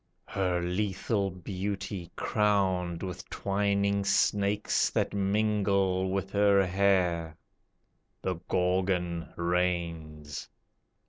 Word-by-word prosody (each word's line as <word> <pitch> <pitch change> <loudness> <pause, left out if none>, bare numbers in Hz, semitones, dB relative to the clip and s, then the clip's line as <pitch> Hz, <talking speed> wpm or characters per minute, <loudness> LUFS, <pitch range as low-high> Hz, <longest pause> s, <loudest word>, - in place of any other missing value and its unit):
Her 90 -3 -1
lethal 100 +2 -1
beauty 95 0 -4
crowned 95 -5 +1
with 90 -1 -6
twining 100 0 0
snakes 100 +1 +2
That - - -1
mingle 100 -2 +1
with 95 0 -2
her 100 -1 +4
hair, 90 -4 +1 0.9
the 95 -2 -1
Gorgon 90 -2 0
reigns. 85 -4 -2
95 Hz, 80 wpm, -29 LUFS, 90-100 Hz, 0.9 s, her